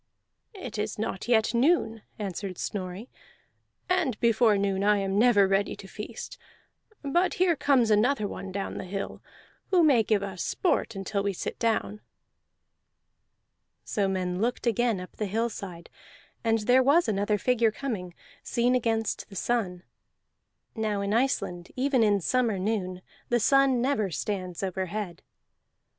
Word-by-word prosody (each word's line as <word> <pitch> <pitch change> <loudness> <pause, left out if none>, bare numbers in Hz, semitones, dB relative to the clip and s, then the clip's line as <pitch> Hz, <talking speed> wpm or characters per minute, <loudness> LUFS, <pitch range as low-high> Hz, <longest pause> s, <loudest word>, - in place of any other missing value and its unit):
"It 370 - -6
is 210 0 -2
not 210 -1 -3
yet 225 -1 +3
noon," 235 -3 +2 0.2
answered 195 -2 -5
Snorri, 190 +3 -5 0.8
"and 280 - 0
before 230 -2 +4
noon 195 -1 0
I 210 0 +4
am 195 0 0
never 215 -4 +5
ready 195 +1 +1
to 195 - -11
feast. 210 +3 -8 0.6
But 345 +8 +1
here 365 -4 +3
comes 260 -6 +3
another 215 +1 +3
one 195 -1 -7
down 195 +1 -4
the - - -5
hill, 195 +2 -5 0.5
who 360 -3 +4
may 275 -7 +5
give 210 -2 +1
us 190 -3 -5
sport 325 - 0
until 195 +1 -2
we 200 0 -1
sit - - -5
down." 220 -2 0 1.8
So 200 -2 0
men 185 -1 -2
looked 240 +3 -1
again 235 -2 +1
up 180 - -10
the 210 - -2
hillside, 200 -5 -3 0.6
and 225 -1 +3
there 250 +4 +4
was 290 +7 +4
another 210 0 +1
figure 235 0 +2
coming, 205 -9 -5 0.3
seen 240 +1 +1
against 225 -3 -1
the 195 - -12
sun. 190 -5 -1 0.9
(Now 215 -3 -1
in 200 +1 -1
Iceland, 220 -8 -1
even 260 -1 +2
in 205 -3 +3
summer 235 +1 +1
noon, 185 -2 -2 0.3
the 240 - +3
sun 270 0 +4
never 235 -7 +1
stands 185 +1 -4
overhead.) 190 -1 -3
215 Hz, 145 wpm, -27 LUFS, 195-240 Hz, 1.8 s, never